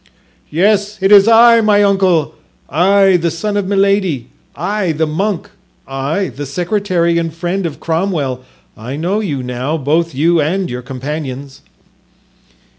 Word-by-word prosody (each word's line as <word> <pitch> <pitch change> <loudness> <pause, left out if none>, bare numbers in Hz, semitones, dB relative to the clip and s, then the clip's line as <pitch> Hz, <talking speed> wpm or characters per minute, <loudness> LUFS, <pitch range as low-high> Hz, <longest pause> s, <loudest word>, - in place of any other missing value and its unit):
"Yes, 205 +4 +1
it 195 +1 +1
is 200 0 +7
I, 230 0 +6
my 205 -1 +3
uncle—I, 185 - +1
the 170 0 -1
son 205 +6 -3
of 200 -2 -1
Milady—I, 195 - -1
the 160 +1 0
monk—I, 180 -3 -4
the 145 +1 -7
secretary 175 +1 0
and 165 -1 -3
friend 175 +3 -3
of 150 - -9
Cromwell—I 140 - -4
know 175 +7 -1
you 150 -11 -3
now, 125 +5 -3
both 160 +2 -1
you 165 +4 +2
and 180 +4 -1
your 125 0 -5
companions." 135 +1 -6
170 Hz, 120 wpm, -15 LUFS, 145-200 Hz, -, is